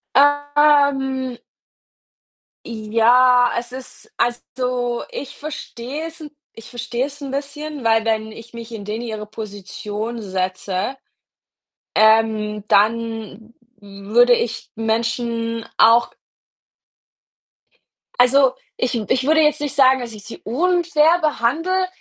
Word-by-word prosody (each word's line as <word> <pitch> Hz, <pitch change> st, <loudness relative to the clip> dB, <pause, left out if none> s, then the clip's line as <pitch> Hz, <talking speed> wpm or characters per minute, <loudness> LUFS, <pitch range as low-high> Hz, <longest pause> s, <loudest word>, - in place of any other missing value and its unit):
Ähm 285 Hz, -3 st, +3 dB, 1.3 s
ja, 235 Hz, +3 st, +4 dB
es 240 Hz, +1 st, -6 dB
ist 265 Hz, -, -9 dB
also, 245 Hz, 0 st, -2 dB
ich 285 Hz, +1 st, -7 dB
verstehe 295 Hz, 0 st, -6 dB
es 330 Hz, 0 st, -10 dB
'n 300 Hz, -1 st, -9 dB, 0.2 s
ich 225 Hz, 0 st, -12 dB
verstehe 240 Hz, +2 st, -3 dB
es 290 Hz, +1 st, -11 dB
'n 275 Hz, -2 st, -6 dB
bisschen, 285 Hz, 0 st, -5 dB
weil 225 Hz, 0 st, +3 dB
wenn 220 Hz, -1 st, -1 dB
ich 230 Hz, +2 st, -12 dB
mich 230 Hz, 0 st, -8 dB
in 210 Hz, -3 st, -7 dB
denen 215 Hz, +3 st, -4 dB
ihre 215 Hz, -2 st, -5 dB
Position 210 Hz, +2 st, -6 dB
setze, 185 Hz, +4 st, -3 dB, 1.0 s
ähm, 215 Hz, -1 st, +3 dB
dann 225 Hz, +1 st, 0 dB, 0.3 s
würde 205 Hz, +5 st, +2 dB
ich 225 Hz, -1 st, -4 dB
Menschen 230 Hz, +1 st, -2 dB
auch 230 Hz, +2 st, +5 dB, 2.1 s
also, 260 Hz, +1 st, +5 dB, 0.2 s
ich 250 Hz, -1 st, -1 dB
w 215 Hz, -4 st, -2 dB
ich 255 Hz, +1 st, +1 dB
würde 315 Hz, +1 st, +4 dB
jetzt 300 Hz, -1 st, +3 dB
nicht 290 Hz, -1 st, -3 dB
sagen, 265 Hz, -2 st, +5 dB
dass 235 Hz, -2 st, -6 dB
ich 210 Hz, -2 st, -11 dB
sie 230 Hz, -, -9 dB
unfair 335 Hz, +3 st, +2 dB
behandle, 320 Hz, +6 st, 0 dB
240 Hz, 115 wpm, -20 LUFS, 220-280 Hz, 2.1 s, auch